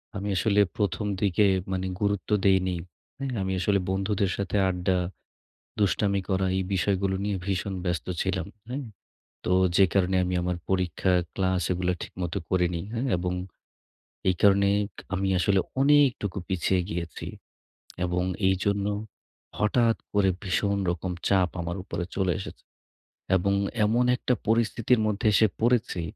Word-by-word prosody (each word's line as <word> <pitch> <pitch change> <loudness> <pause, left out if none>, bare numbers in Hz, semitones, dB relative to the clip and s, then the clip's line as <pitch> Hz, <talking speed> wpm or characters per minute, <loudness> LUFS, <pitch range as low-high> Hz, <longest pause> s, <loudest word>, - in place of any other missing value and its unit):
আমি 100 +1 -3
আসলে 105 +4 +2 0.2
১ম 100 0 0 0.2
দিকে 100 +1 +3 0.3
মানে 95 0 -1
গুরুত্ব 100 0 0 0.2
দেইনি, 95 -1 +3 0.4
হ্যাঁ? 135 -1 -3
আমি 95 0 -1
আসলে 100 +2 +2
বন্ধুদের 95 0 0
সাথে 100 +1 -1
আড্ডা, 90 0 0 0.8
দুষ্টামি 100 -1 +2
করা 95 0 +1
এই 95 - +1
বিষয়গুলো 95 0 +1
নিয়ে 105 -1 -1
ভীষণ 95 0 -1
ব্যস্ত 90 -3 -2 0.2
ছিলাম, 95 -2 -1 0.2
হ্যাঁ? 135 +3 -3 0.6
তো - - 0 0.3
যে 95 - +7
কারণে 95 -1 +2
আমি 90 - -2
আমার 90 0 -1
পরীক্ষা, 95 0 +1 0.2
ক্লাস 95 -1 0
এগুলো 90 0 0
ঠিকমতো 90 +1 -4
করিনি, 90 -2 +1
হ্যাঁ? 125 +4 -1
এবং, 90 +1 -2 1.0
এই 95 - +4
কারণেই 100 0 +5 0.4
আমি 95 0 0
আসলে 95 +1 +3 0.2
অনেকটুকু 135 -9 +3
পিছিয়ে 95 0 +1
গিয়েছি। 85 -1 -5 0.8
এবং 90 0 0 0.2
এইজন্য, 100 +2 +1 0.7
হঠাৎ 115 +2 +3 0.2
করে 100 -2 +3
ভীষণ 100 +1 0
রকম 90 +1 -2 0.2
চাপ 95 -3 +3
আমার 85 +2 -4
উপরে 90 -2 -4
চলে 95 -2 +1
এসেছে। 95 - -9 0.7
এবং 100 +2 +2 0.3
এমন 120 +4 +2
একটা 125 - 0
পরিস্থিতির 115 +1 +2
মধ্যে 105 +2 -1
এসে 110 +3 +5
পড়েছি, 115 -6 +2
95 Hz, 135 wpm, -27 LUFS, 90-105 Hz, 1.0 s, যে